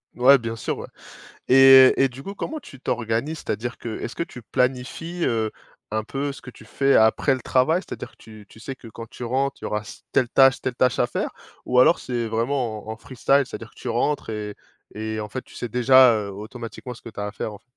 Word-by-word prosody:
Ouais 135 Hz, +3 st, +7 dB
bien 115 Hz, -1 st, -5 dB
sûr, 110 Hz, -, -4 dB
ouais -, -, -7 dB, 0.6 s
et 135 Hz, 0 st, +9 dB
heu -, -, -1 dB
et 135 Hz, -, +5 dB
du 130 Hz, +2 st, -11 dB
coup 195 Hz, +6 st, -7 dB
comment 310 Hz, +9 st, -5 dB
tu 135 Hz, -, -14 dB
t'organises? 120 Hz, +8 st, -2 dB
C'est-à-dire 120 Hz, +1 st, -4 dB
que 115 Hz, -2 st, -6 dB
est-ce 120 Hz, -, -6 dB
que -, -, -1 dB
tu 125 Hz, -7 st, -12 dB
planifies, 130 Hz, +9 st, -2 dB
heu, 110 Hz, -2 st, 0 dB, 0.4 s
un 110 Hz, 0 st, -1 dB
peu 140 Hz, +5 st, -3 dB
ce 145 Hz, -, -12 dB
que 125 Hz, -, -9 dB
tu 110 Hz, -, -16 dB
fais 135 Hz, +4 st, +2 dB
après 110 Hz, +5 st, +4 dB
le 130 Hz, -, -6 dB
travail? 160 Hz, +8 st, +2 dB
C'est-à-dire -, -, -7 dB
que -, -, -25 dB
tu 110 Hz, -2 st, -14 dB
tu -, -, -17 dB
sais 135 Hz, +4 st, -6 dB
que 120 Hz, -, -13 dB
quand 115 Hz, +1 st, -10 dB
tu -, -, -11 dB
rentres 135 Hz, +3 st, -1 dB
il -, -, -10 dB
y -, -, -1 dB
aura 105 Hz, 0 st, -2 dB
s 100 Hz, -, -12 dB
telle 125 Hz, -, +2 dB
tâche, 135 Hz, +1 st, +5 dB
telle 130 Hz, -1 st, -3 dB
tâche 125 Hz, +1 st, +1 dB
à -, -, +3 dB
faire, -, -, -3 dB, 0.4 s
ou 125 Hz, 0 st, +1 dB
alors 165 Hz, +7 st, +6 dB
c'est 120 Hz, -2 st, -3 dB
vraiment 115 Hz, -1 st, -2 dB
en 110 Hz, -, -3 dB
en -, -, -7 dB
free-style, 135 Hz, +3 st, +1 dB
c'est-à-dire 115 Hz, -, -9 dB
que -, -, -23 dB
tu -, -, -6 dB
rentres 120 Hz, +2 st, -1 dB
et 105 Hz, -1 st, -5 dB, 0.4 s
et 110 Hz, 0 st, -4 dB
en 105 Hz, -, -5 dB
fait 130 Hz, +4 st, -5 dB
tu -, -, -19 dB
sais 120 Hz, -, -5 dB
déjà, 125 Hz, +1 st, +6 dB
heu, 105 Hz, -2 st, -3 dB
automatiquement 115 Hz, +4 st, -8 dB
ce -, -, -16 dB
que 115 Hz, -, -9 dB
tu 105 Hz, -, -8 dB
as 105 Hz, -, -2 dB
à 105 Hz, -, -6 dB
faire 105 Hz, -, -5 dB
en 100 Hz, -, -10 dB
fait? -, -, -37 dB
125 Hz, 255 wpm, -23 LUFS, 110-135 Hz, 0.6 s, et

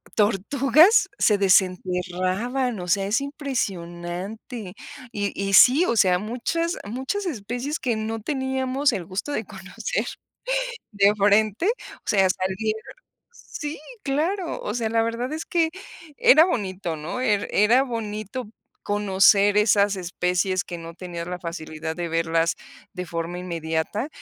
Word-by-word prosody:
tortugas 275 Hz, -, +4 dB
se 210 Hz, -, +3 dB
desenterraban. 185 Hz, +5 st, +1 dB
O 180 Hz, -, -6 dB
sea, 195 Hz, +2 st, +2 dB
es 210 Hz, +6 st, +1 dB
impresionante 200 Hz, -, -5 dB, 0.4 s
y 205 Hz, -3 st, -2 dB, 0.2 s
y -, -, -2 dB
sí, 260 Hz, -, +7 dB
o 235 Hz, -, 0 dB
sea, 185 Hz, -4 st, +4 dB
muchas, 290 Hz, -, -2 dB
muchas 265 Hz, -, -3 dB
especies 255 Hz, -, -3 dB
que 245 Hz, -3 st, 0 dB
no 220 Hz, +1 st, -3 dB
teníamos 265 Hz, +1 st, 0 dB
el 185 Hz, -5 st, -3 dB
gusto 190 Hz, -, -4 dB
de 225 Hz, -6 st, -2 dB
conocer, 190 Hz, -, -4 dB, 0.9 s
de 205 Hz, -1 st, +4 dB
frente. 210 Hz, -, +3 dB, 0.3 s
O -, -, -33 dB
sea, 195 Hz, -2 st, +4 dB
salir. 190 Hz, +4 st, -1 dB, 0.6 s
Sí, 300 Hz, -9 st, -7 dB, 0.2 s
claro. 330 Hz, +7 st, -1 dB
O 210 Hz, -, -3 dB
sea, 230 Hz, -2 st, -1 dB
la 225 Hz, 0 st, +2 dB
verdad 230 Hz, +4 st, -2 dB
es 315 Hz, +1 st, -4 dB
que, 330 Hz, -2 st, +1 dB, 0.5 s
era 310 Hz, +4 st, +7 dB
bonito, 190 Hz, -, -2 dB
¿no?, 155 Hz, +11 st, -5 dB
e 210 Hz, -5 st, +1 dB, 0.2 s
era 240 Hz, +5 st, +5 dB
bonito 215 Hz, -1 st, -5 dB, 0.3 s
conocer 205 Hz, 0 st, +4 dB
esas 205 Hz, -1 st, +4 dB
especies 180 Hz, +1 st, -1 dB
que 175 Hz, -, -6 dB
no 165 Hz, 0 st, -9 dB
tenías 175 Hz, -1 st, -6 dB
la 180 Hz, 0 st, -4 dB
facilidad 160 Hz, -2 st, -5 dB
de 175 Hz, -1 st, -3 dB
verlas 165 Hz, +1 st, +1 dB, 0.4 s
de 180 Hz, -1 st, -5 dB
forma 170 Hz, +1 st, -4 dB
inmediata. 170 Hz, -, -3 dB
205 Hz, 135 wpm, -24 LUFS, 180-255 Hz, 0.9 s, sí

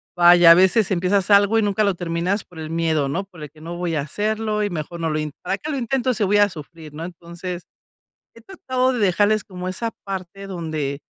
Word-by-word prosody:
vaya, 175 Hz, -1 st, +7 dB
a -, -, +12 dB
veces 190 Hz, +3 st, +3 dB
empiezas 190 Hz, +2 st, +1 dB
algo 205 Hz, +2 st, +5 dB
y -, -, +1 dB
nunca 205 Hz, +1 st, +1 dB
lo 200 Hz, -2 st, +1 dB
terminas 175 Hz, +3 st, -2 dB
por 175 Hz, -3 st, -14 dB
el 155 Hz, -, -6 dB
miedo, 160 Hz, -3 st, 0 dB
¿no? 180 Hz, +7 st, -2 dB
Por 180 Hz, -5 st, -15 dB
el 150 Hz, -, -8 dB
que 155 Hz, 0 st, -18 dB
no 170 Hz, +2 st, -7 dB
voy 175 Hz, -2 st, -2 dB
a 150 Hz, -, 0 dB
hacerlo 215 Hz, +7 st, -2 dB
y 205 Hz, -, -1 dB
mejor 170 Hz, 0 st, -6 dB
no 160 Hz, -, 0 dB
lo 155 Hz, -, -1 dB
int 150 Hz, -1 st, -4 dB
para 195 Hz, -, -1 dB
que 305 Hz, +8 st, -6 dB
lo 280 Hz, -, -2 dB
intento 255 Hz, +1 st, 0 dB
sí 225 Hz, -, -1 dB
voy 205 Hz, +2 st, +2 dB
a 205 Hz, 0 st, +5 dB
sufrir, 155 Hz, -1 st, -11 dB
¿no? 160 Hz, +2 st, -6 dB
Entonces, 175 Hz, 0 st, -7 dB, 0.7 s
he -, -, -15 dB
tratado 260 Hz, -9 st, -1 dB
de 245 Hz, -, -2 dB
dejarles 205 Hz, +2 st, +2 dB
como 180 Hz, -2 st, -7 dB
esa 230 Hz, +5 st, -3 dB
parte 195 Hz, 0 st, -6 dB
donde, 155 Hz, -6 st, -4 dB
180 Hz, 230 wpm, -21 LUFS, 165-205 Hz, 0.7 s, a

